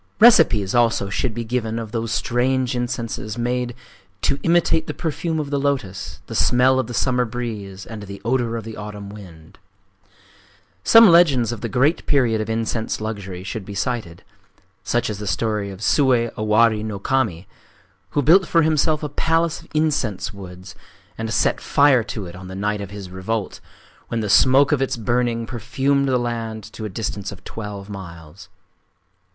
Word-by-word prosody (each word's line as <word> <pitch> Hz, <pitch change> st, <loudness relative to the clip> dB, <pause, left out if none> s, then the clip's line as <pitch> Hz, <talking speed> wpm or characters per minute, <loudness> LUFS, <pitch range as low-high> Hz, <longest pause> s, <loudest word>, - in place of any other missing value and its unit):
Recipes 160 Hz, -, +6 dB
also 115 Hz, -5 st, +2 dB
should 110 Hz, +2 st, -1 dB
be 120 Hz, -, -3 dB
given 115 Hz, -1 st, -2 dB
of 115 Hz, -2 st, -5 dB
those 115 Hz, 0 st, -3 dB
strange 125 Hz, +1 st, 0 dB
incenses 120 Hz, -3 st, -3 dB
made 120 Hz, 0 st, -1 dB, 0.5 s
"to 140 Hz, -, +1 dB
imitate 165 Hz, -1 st, +2 dB
the -, -, -4 dB
perfume 160 Hz, 0 st, -2 dB
of 145 Hz, -2 st, -4 dB
the 140 Hz, -, +1 dB
lotos, 125 Hz, -10 st, -3 dB
the -, -, -8 dB
smell 130 Hz, +1 st, +3 dB
of 130 Hz, -, -1 dB
the 120 Hz, -, -6 dB
summer 125 Hz, -1 st, +2 dB
breeze, 110 Hz, -5 st, -5 dB
and 110 Hz, -2 st, -8 dB
the 100 Hz, -1 st, -8 dB
odor 120 Hz, -1 st, 0 dB
of 115 Hz, -, -5 dB
the 110 Hz, 0 st, -8 dB
autumn 105 Hz, -1 st, -7 dB
wind." 85 Hz, -6 st, -13 dB, 1.2 s
Some 225 Hz, 0 st, +8 dB
legends 150 Hz, -, +5 dB
of 115 Hz, -3 st, -6 dB
the 115 Hz, -, -3 dB
great 135 Hz, +8 st, +2 dB
period 120 Hz, -7 st, +2 dB
of 110 Hz, -, -4 dB
incense 115 Hz, 0 st, -2 dB
luxury 100 Hz, -4 st, -5 dB
should 110 Hz, +1 st, -5 dB
be 100 Hz, +1 st, -8 dB
cited,—such 100 Hz, 0 st, -4 dB
as 105 Hz, -2 st, -4 dB
the 105 Hz, -, -5 dB
story 105 Hz, 0 st, -1 dB
of 95 Hz, 0 st, -9 dB
Sué 125 Hz, -2 st, +3 dB
Owari 110 Hz, 0 st, +2 dB
no 110 Hz, -2 st, -4 dB
Kami, 100 Hz, -6 st, -1 dB, 0.7 s
who 145 Hz, -, +3 dB
built 175 Hz, +6 st, +5 dB
for 165 Hz, -1 st, +3 dB
himself 155 Hz, 0 st, +2 dB
a -, -, -1 dB
palace 165 Hz, +2 st, 0 dB
of -, -, -18 dB
incense 130 Hz, -11 st, 0 dB
woods, 95 Hz, -1 st, -10 dB, 0.4 s
and 115 Hz, 0 st, -4 dB
set -, -, +1 dB
fire 140 Hz, -3 st, +4 dB
to 105 Hz, -2 st, -5 dB
it 85 Hz, -, -9 dB
on 90 Hz, 0 st, -10 dB
the 95 Hz, -, -8 dB
night 105 Hz, +1 st, -1 dB
of 100 Hz, -, -6 dB
his 100 Hz, -2 st, -9 dB
revolt, 95 Hz, +3 st, -3 dB, 0.5 s
when 115 Hz, -, -2 dB
the 105 Hz, -, -3 dB
smoke 135 Hz, +5 st, +5 dB
of 145 Hz, -3 st, +2 dB
its 135 Hz, -1 st, -1 dB
burning 120 Hz, 0 st, 0 dB
perfumed 140 Hz, +4 st, 0 dB
the 130 Hz, -1 st, +2 dB
land 115 Hz, -3 st, -3 dB
to 110 Hz, -, -6 dB
a -, -, -4 dB
distance 100 Hz, 0 st, -4 dB
of 100 Hz, -, -12 dB
twelve 105 Hz, -3 st, -7 dB
miles…. 85 Hz, -6 st, -10 dB
115 Hz, 175 wpm, -21 LUFS, 100-130 Hz, 1.2 s, Some